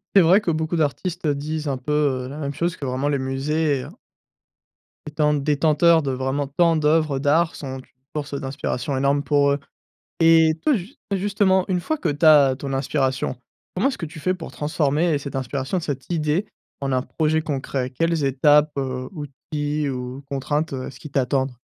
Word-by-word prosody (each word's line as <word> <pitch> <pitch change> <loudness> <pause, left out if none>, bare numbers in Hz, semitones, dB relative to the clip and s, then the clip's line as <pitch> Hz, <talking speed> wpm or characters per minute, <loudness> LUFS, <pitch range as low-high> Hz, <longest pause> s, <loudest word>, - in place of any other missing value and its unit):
C'est 195 - +9
vrai 180 +5 +5
que 180 - -2
beaucoup 160 +1 -1
d'artistes, 165 +4 -1
heu, 145 - +2
disent 155 +1 -4
un 135 - -1
peu, 135 +4 -5 0.3
heu, - - -6
la 145 - -7
même 140 -2 -3
chose 170 +4 -1
que 140 - -6
vraiment 130 +2 -1
les 140 -2 0
musées 140 +2 -1 1.2
étant 150 0 +1
détenteurs 150 +3 +3
de 135 - -1
vraiment 135 +2 -1
tant 165 +4 +3
d'oeuvres 155 -2 +2
d'art, 160 +4 +2
sont 135 -2 -6
une - - -13 0.3
source 145 -1 -4
d'inspiration 135 -1 -3
énorme 140 +1 +2
pour 145 -1 +3
eux 140 - 0 0.6
et 165 -1 +5
toi, 305 - +4
just 210 +6 -7
et 195 - +2
justement, 190 -1 +2
une 180 -2 0
fois 315 - -1
que - - -1
tu 145 +3 0
as 145 -4 +7
ton 135 0 -5
inspiration, 135 -1 -1 0.4
comment 205 +9 +2
est-ce 270 - -6
que 165 - -4
tu 155 +1 -10
fais 185 +4 0
pour 175 -3 -8
transformer 150 +1 +1
cette 140 -1 -7
inspiration, 135 +6 -2
cette 145 -1 -5
idée, 160 +4 0 0.3
en 135 -1 -1
un 130 0 +1
projet 155 0 0
concret? 135 -3 -3
Quelles 165 +2 0
étapes, 145 +3 +4
heu, 130 -1 -3
outils 150 -1 -4
ou 125 +1 -5
contraintes, 145 +2 -1
heu, 130 -1 -4
est-ce - - -11
qui 150 - -10
t'attendrent? 130 -1 0
145 Hz, 190 wpm, -22 LUFS, 135-160 Hz, 1.2 s, C'est